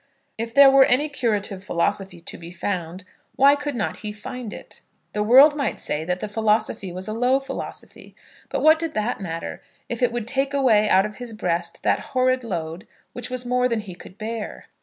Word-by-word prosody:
If 230 +1 -4
there 280 -1 +9
were 270 0 +7
any 285 +5 +2
curative 210 -8 -1
philosophy 190 +1 -1
to 165 - -7
be 170 0 -10
found, 180 0 -4 0.3
why 280 +1 +6
could 290 -1 -4
not 215 - -2
he 210 -1 -5
find 215 +2 -7
it? - - -11 0.3
The 210 - -1
world 265 +8 +7
might 280 -2 -2
say 150 +1 -2
that 180 +1 -2
the - - -3
philosophy 215 -2 0
was 185 +2 -6
a 215 - -3
low 250 +4 +2
philosophy; 270 - -8 0.3
but - - -2
what 315 +1 +6
did 330 -1 -4
that 215 +1 -1
matter, 165 -3 -5 0.3
if 240 0 -4
it 245 -1 +3
would 235 -2 -4
take 270 +2 0
away 220 -6 +4
out 190 +1 +5
of 210 0 -7
his 245 -2 -6
breast 175 -4 -1
that - - +2 0.2
horrid 255 0 +2
load 170 -4 -5 0.3
which 245 0 -5
was 250 0 -4
more 250 0 +2
than 230 -2 -1
he 195 -3 -9
could 180 +2 -14
bear? 220 0 -6
220 Hz, 200 wpm, -23 LUFS, 195-255 Hz, 0.3 s, there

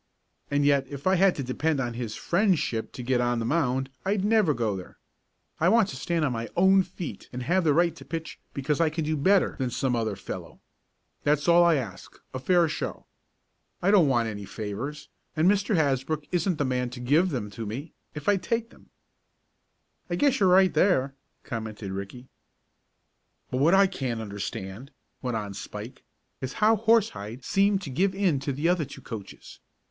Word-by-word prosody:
And 145 0 +1
yet 140 -2 +3
if 140 0 -8
I 185 - +4
had 190 0 +4
to 140 - -3
depend 145 +4 -1
on 120 -3 -2
his 115 -2 -4
friendship 175 - 0
to 125 - -7
get 125 0 +1
on 120 0 +1
the 115 - -2
mound 135 -2 0
I'd 195 0 0
never 210 -6 +4
go 110 -4 -1
there. 90 -1 -9 0.6
I 170 - +4
want 225 -2 +4
to - - -6
stand 165 +4 -1
on 140 - 0
my 115 -1 -4
own 190 +2 +6
feet 175 - -7
and 125 0 -5
have 180 +8 +2
the 155 - +3
right 170 +2 +3
to - - -11
pitch 165 -1 -6
because 140 +2 -1
I 165 - +4
can 155 0 -3
do 155 +1 0
better 190 +7 +3
than 130 -2 0
some 125 +1 0
other 110 -3 -1
fellow. 95 - -8 0.6
That's 145 +1 +1
all 170 0 +7
I 170 -1 +5
ask 115 -10 -6 0.2
a 130 - -3
fair 175 +4 +3
show. 155 - -4 0.7
I 195 - +2
don't 190 -7 +6
want 120 -4 +2
any 105 -2 -5
favors, 110 +9 -6 0.3
and 160 +3 +4
Mr. 205 +1 +2
Hasbrook 145 0 0
isn't 180 -1 +1
the 145 - 0
man 125 -1 -1
to 125 +1 -9
give 150 +9 +3
them 115 - -4
to 110 +1 -6
me, 135 +9 -6 0.2
if 150 - -7
I'd 200 -2 +3
take 230 +5 -2
them." - - -20 1.2
"I 175 - 0
guess 270 +6 +2
you're 190 -2 +4
right 185 0 +5
there," 150 -5 +2 0.3
commented 110 -3 -5
Ricky. 100 +7 -7 1.2
"But 125 - -1
what 155 +8 +4
I 195 +1 +6
can't 130 -11 -3
understand," 100 +2 -6 0.3
went 125 -3 -2
on 100 -2 -5
Spike, 105 +5 -8 0.4
"is 130 0 -4
how 220 +1 +4
Horsehide 185 - +1
seemed 195 0 +2
to 140 - -6
give 190 +8 +1
in 185 -8 +2
to 140 +1 -3
the 145 +5 -1
other 175 -3 +2
two 135 0 -11
coaches. 110 -5 -9
145 Hz, 195 wpm, -27 LUFS, 120-180 Hz, 1.2 s, all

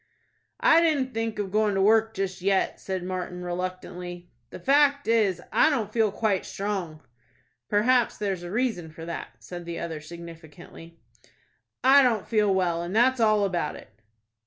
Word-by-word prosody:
"I 330 0 +6
didn't 285 -6 +1
think 225 -1 -2
of 200 -2 -3
going 210 -1 +1
to 195 - +1
work 220 +1 +3
just 190 -1 -3
yet," 195 0 +1
said 190 -2 -4
Martin, 180 -1 -5
reluctantly. 180 0 -6 0.2
"The - - -9
fact 285 +1 +3
is, 215 -6 +2
I 315 - +4
don't 220 -8 -2
feel 220 -3 +2
quite 205 -2 0
strong." 190 -6 -4 0.7
"Perhaps 240 +3 +2
there's 195 -4 -2
a 175 - -7
reason 215 -6 -1
for 160 +1 -10
that," 170 - -5 0.2
said 175 -1 -8
the 170 0 -5
other, 160 -2 -5
significantly. 165 0 -12 0.9
"I 270 +2 +7
don't 235 -6 +1
feel 210 -3 +2
well, 175 -3 +1
and 175 +4 -5
that's 255 +3 +3
all 215 -2 +3
about 180 -3 -2
it." - - -13
195 Hz, 160 wpm, -26 LUFS, 175-225 Hz, 0.9 s, I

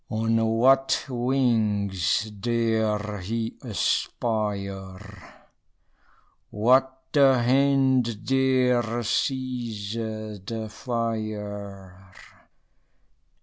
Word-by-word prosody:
On 115 +1 0
what 130 +4 +3
wings 110 - 0
dare 110 -1 -1
he 115 +5 -3
aspire? 100 -3 -2 1.5
What 130 +4 +2
the 135 -3 +5
hand 130 -3 +2
dare 125 -3 +2
seize 120 -4 -2
the 110 -1 -5
fire? 105 -5 -5
115 Hz, 60 wpm, -25 LUFS, 105-125 Hz, 1.5 s, the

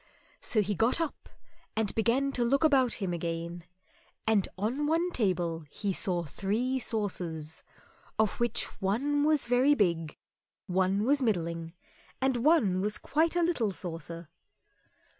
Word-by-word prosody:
So 215 -3 +2
he 205 +1 -1
got 225 - +1
up 330 -3 -4 0.5
and 220 -2 0
began 245 +5 +1
to 250 -3 0
look 275 +5 +2
about 265 -6 +4
him 190 -5 -3
again, 170 0 -4 0.6
and 215 -3 +3
on 245 +9 -1
one 335 +3 +1
table 175 - 0
he 200 +5 -3
saw 175 -2 0
three 220 - -1
saucers, 175 -9 -3 0.6
of 220 -3 +1
which 240 -2 +1 0.2
one 275 +10 +1
was 305 -1 +3
very 255 +4 +4
big, 170 - 0 0.5
one 190 +2 +1
was 280 +4 +3
middling, 170 -7 -1 0.5
one 255 - +3
was 210 +1 0
quite 320 +3 +1
a 350 - +3
little 255 - +1
saucer. 170 -2 -6
215 Hz, 135 wpm, -29 LUFS, 175-265 Hz, 0.6 s, about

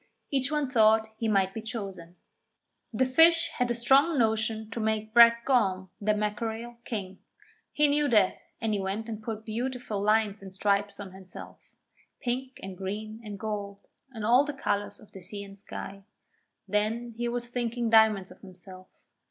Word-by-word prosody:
Each 270 0 0
one 300 -2 0
thought 220 -3 +4
he 230 - -1
might 195 -3 +2
be 225 - -5
chosen. 195 -7 -6 0.8
The 245 +3 +2
Fish 330 +5 +5
had 250 0 +1
a 240 - 0
strong 275 +7 +4
notion 220 -1 +1
to 230 - -4
make 220 0 -1
Brac 235 0 +7
Gorm, 190 -8 +1
the 210 +1 +2
Mackerel, 220 +3 -3
king. 195 -4 -5 0.5
He 300 0 +3
knew 290 0 +2
that, 210 -5 +4 0.2
and 220 -2 -1
he 205 - 0
went 195 +4 -3
and 220 -2 -6
put 220 0 -6
beautiful 235 -2 -3
lines 210 -1 +2
and 195 -1 -9
stripes 200 +1 0
on 200 -2 -7
himself 190 -1 -12 0.4
pink 255 +1 -3
and 190 -1 -6
green 215 +4 -5
and 210 -2 -7
gold, 200 -1 -5 0.2
and 220 -4 -5
all 245 +5 +6
the 295 0 -4
colours 205 -6 -2
of 215 - -18
the 190 - -11
sea 200 +3 -6
and 195 0 -11
sky. 195 0 -8 0.7
Then 215 +4 -1
he 240 +1 -2
was 240 0 -3
thinking 240 -1 -2
diamonds 215 -4 +5
of 185 - -15
himself. 185 -1 -11
220 Hz, 170 wpm, -28 LUFS, 200-240 Hz, 0.8 s, Brac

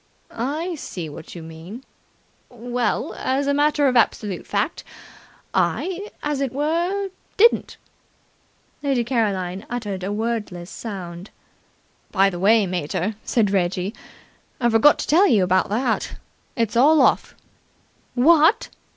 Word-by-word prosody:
"I 300 +9 -3
see 180 - -6
what 155 +4 -10
you 170 - -8
mean. 165 +10 -10 0.7
Well, 245 -1 -2
as 270 +2 -1
a 280 - +1
matter 290 0 +2
of 255 - +1
absolute 210 -4 +1
fact, - - -1 0.7
I, 380 +3 -1
as 295 -2 -1
it 270 -3 -1
were, 340 +8 -1 0.3
didn't." 465 +3 +4 1.0
Lady 270 -4 +1
Caroline 200 -6 -1
uttered 210 -6 -4
a 195 - -2
wordless 210 -5 -3
sound. 185 -4 -7 0.8
"By 195 -1 +3
the 175 - -6
way, 210 +2 +4
mater," 180 +2 -2
said 215 -5 +1
Reggie, 185 +1 0 0.7
"I 240 - +2
forgot 225 +7 +5
to - - -4
tell 360 +7 +5
you 210 -6 +4
about 185 +1 +2
that. 225 +2 -1 0.4
It's 230 -3 -1
all 295 +6 +5
off." - - +2 0.8
"What!" 320 - +4
230 Hz, 125 wpm, -22 LUFS, 190-285 Hz, 1.0 s, forgot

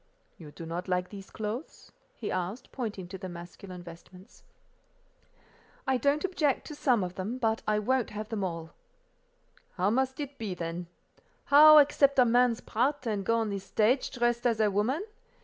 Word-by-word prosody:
"You 155 -3 -12
do 165 - -9
not 170 +3 -5
like 180 0 -1
these 195 -2 -10
clothes?" 220 +7 -6 0.2
he 215 - -5
asked, 185 +8 -4
pointing 210 -8 -5
to 190 0 -7
the 185 -1 -6
masculine 175 +1 -10
vestments. 180 +4 -14 1.4
"I 265 -1 +2
don't 285 +7 +1
object 310 -7 0
to - - -7
some 250 -8 +2
of 180 -1 -4
them, 200 +7 -4
but 225 -3 0
I 215 0 +2
won't 245 +3 0
have 215 +1 -6
them 215 -3 -2
all." 165 -3 -4 1.0
"How 190 +2 +1
must 265 +3 0
it 285 -1 -6
be, 205 -5 -3
then? 170 0 -5 0.6
How 305 +2 +9
accept 280 -1 +5
a 255 - +6
man's 240 0 +3
part, 255 +4 -1
and 210 -3 -1
go 230 +4 +1
on 225 -2 0
the 200 -1 -3
stage 220 +6 +1
dressed 240 0 0
as 230 -2 0
a 210 -2 +3
woman? 235 - 0
220 Hz, 175 wpm, -29 LUFS, 185-255 Hz, 1.4 s, How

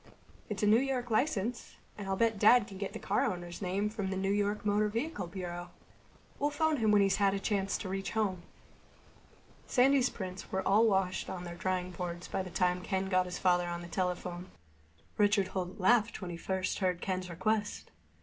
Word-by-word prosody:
"It's 210 -1 -3
a - - +5
New 215 +2 +6
York 255 -2 -2
license. 230 -1 0 0.2
And 205 -2 -7
I'll 195 - 0
bet 225 0 +1
Dad 230 +2 +6
can 195 -2 -10
get 200 - -4
the - - -4
car - - 0
owner's 175 0 -3
name 195 +2 0
from 210 -3 -3
the 190 - -2
New 195 +1 0
York 205 +1 0
Motor 210 +1 +2
Vehicle 230 - -3
Bureau. 175 -1 -6 0.7
We'll 290 - +2
phone 310 +1 +1
him 220 -3 +2
when 205 -1 +5
he's 195 - +2
had 200 -1 +3
a - - -1
chance 195 -1 0
to - - -6
reach 195 +1 -3
home." 200 -5 0 1.3
Sandy's 265 0 +4
prints 185 -2 -7
were 190 0 -1
all 215 +4 +5
washed 190 -3 +1
and 190 - -4
on 175 - -7
their 175 -1 -6
drying 185 +1 -2
boards 175 0 -5
by - - -2
the 185 - -6
time 180 0 +1
Ken 190 0 -2
got 185 -1 +2
his 180 - -4
father 175 -1 +2
on 175 0 -4
the - - -8
telephone. 180 0 -3 0.7
Richard 205 -2 +3
Holt 185 +2 -4
laughed 230 +3 +3
when 180 -3 -5
he - - -5
first 190 +2 -2
heard 180 -3 0
Ken's 185 -1 -3
request. 205 +4 -1
195 Hz, 205 wpm, -32 LUFS, 180-210 Hz, 1.3 s, New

